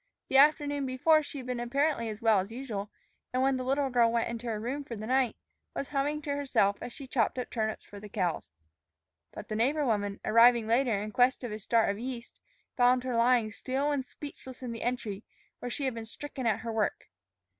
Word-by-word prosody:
The 265 - +4
afternoon 290 -1 +4
before 310 +5 +4
she 290 - -8
had 260 - -6
been 250 -1 -3
apparently 240 0 0
as 215 +1 -7
well 220 -3 +5
as 190 +2 -3
usual, 225 -4 -5 0.4
and 255 +1 +1
when 270 0 +3
the 255 - -2
little 270 +1 0
girl 235 -2 +4
went 230 0 0
into 235 +1 -5
her 220 -2 -2
room 260 +6 -3
for 240 - -7
the 215 0 -6
night, 255 -1 +2 0.4
was 275 - -3
humming 290 +1 -1
to 285 -1 -1
herself 260 -8 +1
as 245 - -5
she 275 - -9
chopped 250 -2 0
up 250 - -4
turnips 220 -1 -2
for 205 - -11
the 210 +1 -10
cows. 180 - -2 0.8
But 210 - -9
the 215 - -3
neighbor 280 +7 +2
woman, 205 -4 0
arriving 235 0 +6
later 230 -1 +2
in 215 - -5
quest 250 +2 +3
of 240 - -4
a 215 - -5
start 225 0 +2
of 200 - -6
yeast, 240 -1 -6 0.4
found 250 0 +4
her 255 -2 -2
lying 230 -2 +3
still 270 +5 -1
and 280 -2 0
speechless 260 -1 -10
in 245 - -4
the 230 - -6
entry, 230 -4 -3 0.4
where 245 - -4
she 275 +3 -3
had 260 - 0
been 230 -1 -6
stricken 265 +2 -5
at 220 0 +1
her 230 0 -4
work. 215 -2 -1
245 Hz, 220 wpm, -30 LUFS, 225-270 Hz, 0.8 s, arriving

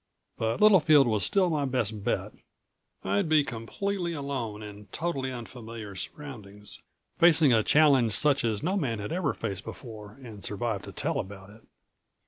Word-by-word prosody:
But 115 +1 -1
Littlefield 155 -9 +6
was 110 -4 +1
still 185 - +3
my 150 -2 0
best 115 -6 -1
bet - - -1 0.7
I'd 100 +10 0
be 155 -2 +5
completely 170 - -3
alone 130 -8 -4
in 105 0 -10
totally 135 - -3
unfamiliar 115 -3 -8
surroundings, 105 -2 -8 0.4
facing 160 -5 +6
a 110 - +4
challenge 135 -4 +4
such 140 +4 +3
as 110 -3 -1
no 185 +5 0
man 135 - -1
had 105 0 -5
ever 170 -7 -1
faced 100 -4 -4
before 110 -4 -9
and 110 -5 -10
survived 105 -1 -2
to - - -8
tell - - -2
about 95 +1 -8
it. 110 +2 -17
120 Hz, 155 wpm, -28 LUFS, 105-150 Hz, 0.7 s, Littlefield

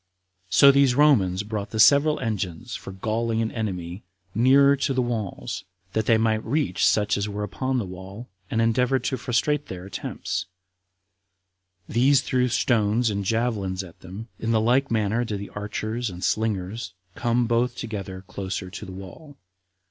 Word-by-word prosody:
So 140 +8 +7
these 140 -2 +4
Romans 105 -11 +4
brought 105 -1 -4
the 110 - -4
several 145 +6 +6
engines 110 0 -3
for - - -7
galling 110 +4 -1
an 110 - -2
enemy 90 -4 -4 0.3
nearer 140 +4 +5
to 135 0 -1
the - - +1
walls, 115 -5 -4 0.3
that 110 -1 0
they 115 - +5
might 110 -1 +1
reach 120 - 0
such 105 -1 +3
as 100 +1 -2
were 105 0 -4
upon 130 +6 -2
the 115 - -1
wall, 95 +5 -9 0.2
and 115 0 +1
endeavored 125 +3 +2
to 130 - -1
frustrate 125 +5 0
their 90 0 -7
attempts; 95 -2 -4 1.4
these 130 +3 +4
threw 125 -3 +1
stones 115 -1 +2
and 100 -1 -2
javelins 100 -4 -1
at 85 -3 -14
them; 95 +5 -9
in 115 - -3
the 115 -1 +3
like 125 +5 +2
manner 110 +1 +1
did 105 -4 -3
the 100 - -7
archers 110 +3 -3
and 90 0 -8
slingers 110 0 -1 0.2
come 120 +3 +1
both 120 +1 +1
together 95 -5 -6
closer 95 -1 -5
to - - -7
the - - -8
wall. 100 - -11
110 Hz, 165 wpm, -25 LUFS, 100-125 Hz, 1.4 s, So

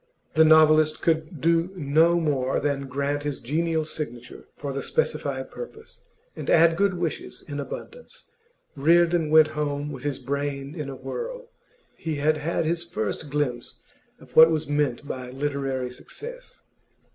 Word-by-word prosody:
The 160 - +6
novelist 155 -1 +5
could 160 -2 0
do 165 +2 +2
no 165 +2 +3
more 135 -5 0
than 140 -1 -1
grant 140 +2 -1
his 145 -2 -3
genial 160 +5 -1
signature 125 -6 -7
for 140 -1 -5
the 140 - -3
specified 475 - -1
purpose, 455 -2 -10 0.3
and - - -6
add 165 0 +5
good 200 +1 +2
wishes 160 -7 -4
in 145 -1 -5
abundance. 480 - -8 0.5
Reardon 170 +2 +3
went 155 0 +6
home 150 -1 -3
with 135 -3 -7
his 145 -2 -1
brain 140 0 -3
in 150 -4 -5
a 135 - -6
whirl. - - -6 0.5
He 160 -2 -3
had 155 +2 +2
had 165 +2 -1
his 170 +1 0
first 140 0 -4
glimpse 130 -4 -2 0.4
of - - -17
what 160 +1 +9
was 155 -3 -1
meant 145 -2 -1
by 130 -2 -5
literary 135 -2 -2
success. - - -10
150 Hz, 150 wpm, -25 LUFS, 140-165 Hz, 0.5 s, what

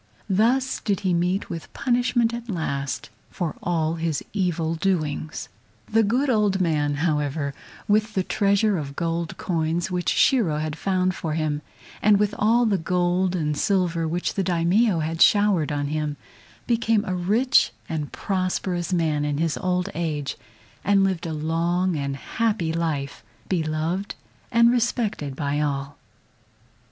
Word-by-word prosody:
Thus 245 +7 +2
did 200 -3 -1
he 185 -3 +1
meet 180 +3 0
with 165 - -6
punishment 245 -2 +1
at 235 0 -6
last 140 -7 -3 0.2
for 170 -5 -3
all 165 -1 0
his 160 -2 -1
evil 175 -5 0
doings. 160 -3 -2 0.4
The 225 +1 +5
good 240 +7 +1
old 210 -6 +2
man, 150 -5 +1
however, 145 -2 -1 0.3
with 215 +1 +2
the 190 - +2
treasure 200 0 +2
of 140 -2 -6
gold 165 0 -2
coins 170 +1 -1
which 175 -5 0
Shiro 205 - +3
had 155 0 -2
found 185 +1 0
for 160 -3 -3
him, 155 -2 -1 0.4
and 210 -1 +5
with 210 0 +1
all 230 +3 +4
the 200 -4 +2
gold 180 +2 +1
and 150 -4 0
the 145 - -4
silver 180 -5 +1
which 175 +3 -1
the 195 - 0
Daimio 180 +2 +2
had 160 +1 -3
showered 205 -7 +4
on 145 -1 -1
him, 150 -1 -2 0.5
became 225 -2 +2
a 185 - -2
rich 215 +9 +3 0.2
and 155 -3 -3
prosperous 185 -2 -2
man 160 -4 +1
in 145 -1 -1
his 165 0 0
old 180 0 0
age, 155 -4 -2 0.5
and 200 0 +4
lived 185 -3 0
a - - -3
long 170 +4 0
and 140 -2 -2
happy 205 -2 -1
life, 155 -4 -2 0.2
beloved 165 +3 -1 0.4
and 235 0 +5
respected 225 - -1
by 145 0 -1
all. 140 -1 -2
175 Hz, 150 wpm, -24 LUFS, 155-200 Hz, 0.5 s, The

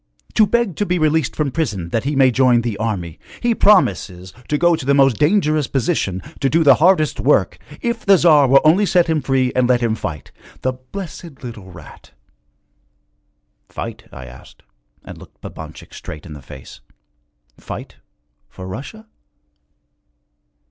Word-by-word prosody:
To 215 - +4
beg 235 -7 0
to 205 - 0
be 180 - 0
released 155 -2 0
from 150 -3 -1
prison 105 - -3
that 115 +6 -2
he 145 +1 -1
may 135 -1 +4
join 125 -1 +3
the 115 -3 -3
army. 95 -7 -4 0.2
He 240 -1 +1
promises 95 - +2
to 150 - 0
go 175 +2 +3
to 155 - -7
the 140 +2 +2
most 135 -5 +4
dangerous 155 -3 +2
position, 115 - -1 0.2
to 135 - +1
do 165 +3 +2
the 140 - +7
hardest 170 -3 +3
work, - - +1 0.2
if 235 -1 -3
the 195 -2 +5
Tsar 150 -5 +5
will 135 +2 +5
only 180 +7 +4
set 175 0 +3
him 160 -2 0
free 130 -1 0
and 125 -1 +2
let 125 -1 +3
him 115 -2 +1
fight. 80 -9 -6 0.3
The 130 - 0
blessed 155 +2 -10
little 110 -6 -9
rat!' 85 -4 -15 1.6
'Fight?' - - -7
I 65 - -10
asked, 65 0 -15 0.4
and - - -10
looked - - -17
Babanchik - - -10
straight 75 - -9
in 80 - -9
the 75 - -11
face, 65 0 -13 0.8
'fight - - -9 0.5
for 95 - -10
Russia?' 145 - -8
135 Hz, 160 wpm, -19 LUFS, 110-165 Hz, 1.6 s, the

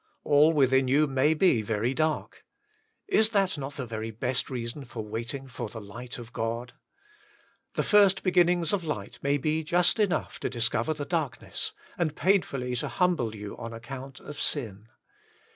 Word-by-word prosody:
All 150 +2 +5
within 130 -3 +3
you 145 +4 +4
may 140 +2 +2
be 155 - +4
very 110 +4 -1
dark; 155 +1 -1 0.6
is 220 - +4
that 195 -5 +2
not 140 -1 -6
the 130 - -4
very 110 -1 -4
best 125 +3 -1
reason 125 +2 -4
for 115 -3 -7
waiting 115 +5 -5
for 120 -3 -6
the 110 - -7
light 115 +4 -7
of 120 0 -10
God? 115 +2 -3 1.0
The - - +1
first 200 -2 +5
beginnings 175 -2 +3
of 195 -3 0
light 105 -11 -5
may 140 +1 +2
be 155 +3 0
just 175 +7 +3
enough 205 -4 0
to - - -2
discover 120 +4 +1
the 145 -1 -4
darkness, 160 -5 -2 0.3
and 155 -3 0
painfully 140 -9 +1
to - - -1
humble 165 -12 +1
you 105 -1 -7
on 115 -1 -6
account 130 +3 -8
of 150 - -9
sin. 110 -7 -2
135 Hz, 165 wpm, -28 LUFS, 115-160 Hz, 1.0 s, All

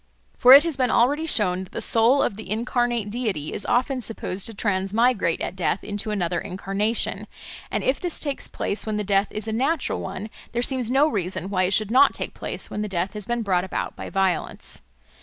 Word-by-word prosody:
For 250 +1 +8
it 280 +2 +10
has 330 -4 -2
been 255 -2 +2
already 290 +9 +2
shown 185 - +2
that 185 - -15
the - - -3
soul 235 +5 +4
of - - -1
the 215 -2 -9
incarnate 235 0 -1
deity 210 -11 -3
is - - -3
often 255 +1 +1
supposed 200 -4 -3
to 225 - -5
transmigrate 200 0 +1
at - - -3
death 185 0 -1
into 205 +1 -4
another 180 -4 -1
incarnation; 200 +3 -2 0.4
and - - -2
if 265 - +1
this 355 -2 -2
takes 285 -3 -2
place 200 - -2
when 215 -1 -1
the 210 - -1
death 200 0 +2
is 215 +1 -4
a 220 - -2
natural 270 +6 0
one, 195 +3 -6 0.2
there 240 +1 0
seems 255 -3 0
no 275 +4 +4
reason 190 - -3
why 185 -2 +2
it 185 - 0
should 215 +1 +1
not 270 +3 +5
take - - -4
place - - -5
when 210 - -3
the 210 - -2
death 185 +1 -2
has 210 -2 -6
been 240 -1 -1
brought 185 -3 +1
about 190 - -4
by - - -7
violence. 190 -3 -1
215 Hz, 215 wpm, -24 LUFS, 195-245 Hz, 0.4 s, it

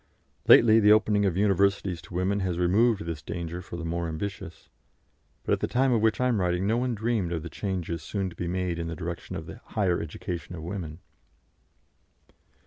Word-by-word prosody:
Lately, 115 -1 +8
the 105 -1 +5
opening 105 -1 +4
of 90 -2 -1
universities 100 -3 +2
to 85 - -11
women 95 +3 +1
has 90 -3 -1
removed 100 +3 +2
this 80 -3 -4
danger 85 +2 -5
for 90 -1 -8
the 85 - -5
more 85 +1 -2
ambitious; 90 +2 -6 0.8
but - - +1
at - - +1
the - - -1
time 130 +1 +2
of 115 -3 +2
which 110 0 +2
I 125 - +2
am 115 -6 +1
writing 90 +1 0
no 110 +3 +2
one 125 -1 0
dreamed 110 -5 -1
of 80 -3 -3
the 85 - -7
changes 90 -5 -3
soon 95 +1 -3
to - - -14
be 85 - -4
made 90 -1 -2
in 85 - -3
the 85 - -4
direction 85 +2 -6
of - - -5
the - - -10
"higher 95 -5 0
education 85 +1 -6
of 80 - -8
women." 85 -2 -6
90 Hz, 205 wpm, -27 LUFS, 85-105 Hz, 0.8 s, Lately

